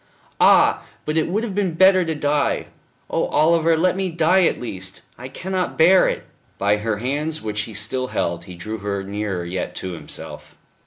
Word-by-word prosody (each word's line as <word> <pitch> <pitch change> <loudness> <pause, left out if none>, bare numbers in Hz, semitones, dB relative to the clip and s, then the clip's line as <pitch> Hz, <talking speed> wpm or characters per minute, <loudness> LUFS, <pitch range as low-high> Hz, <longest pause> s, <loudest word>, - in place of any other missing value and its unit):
"Ah! - - +5 0.2
but 155 - -2
it 160 - +2
would 205 +6 -1
have 220 -4 -3
been 190 -4 -1
better 190 +1 +6
to 165 -2 -2
die.... 145 -1 0 0.4
Oh, - - 0
Oliver, 165 +1 +3
let 180 +3 +2
me 190 -1 -1
die 170 +2 +3
at - - +1
least! 95 -5 -7
I 125 - -8
cannot 185 +6 -3
bear 180 +4 +6
it." - - -2 0.3
By 100 +1 +2
her 110 0 -2
hands 150 +7 -3
which 105 -1 -2
he 110 - -9
still 120 +5 -2
held 85 -7 -2
he 90 -2 -10
drew 110 +6 -6
her 100 -1 -3
nearer 100 -2 -3
yet 90 +1 -4
to 95 - -5
himself. 85 - -10
145 Hz, 190 wpm, -21 LUFS, 105-170 Hz, 0.4 s, better